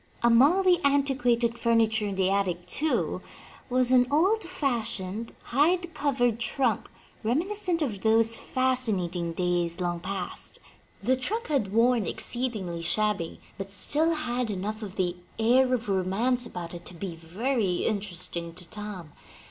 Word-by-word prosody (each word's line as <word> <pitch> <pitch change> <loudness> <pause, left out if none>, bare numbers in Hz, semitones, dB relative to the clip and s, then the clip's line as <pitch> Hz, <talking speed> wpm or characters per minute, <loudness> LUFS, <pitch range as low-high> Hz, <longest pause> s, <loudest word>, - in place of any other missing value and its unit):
Among 270 +11 +5
the 360 -3 +3
antiquated 250 -4 +2
furniture 225 -2 +2
in 200 - -3
the 190 0 +1
attic, 185 -3 -1
too, 310 +1 -1 0.5
was 255 0 +2
an 250 -1 +5
old 385 +9 +2
fashioned, 230 - -2
hide 340 +6 +1
covered 245 -5 0
trunk, 235 -2 -1 0.3
reminiscent 340 - 0
of 210 -9 -4
those 225 +1 +4
fascinating 205 -12 0
days 175 -1 -1
long 175 -1 -1
past. 185 0 -4 0.5
The 255 +5 +3
trunk 420 - -3
had 255 -10 0
worn 230 -2 +3
exceedingly 210 -10 -2
shabby, 205 -1 0 0.2
but 195 0 -5
still 310 - +4
had 245 -5 -2
enough 210 +2 -4
of 200 -3 -7
the 180 -2 -1 0.2
air 250 +3 +3
of 245 -3 -1
romance 205 +6 +1
about 175 -5 -7
it 175 0 -8
to 180 - -3
be 175 0 -6
very 190 +4 -1
inter 205 -4 -2
esting 170 0 -4
to 180 - -8
Tom. 210 -7 -6
225 Hz, 140 wpm, -27 LUFS, 190-260 Hz, 0.5 s, Among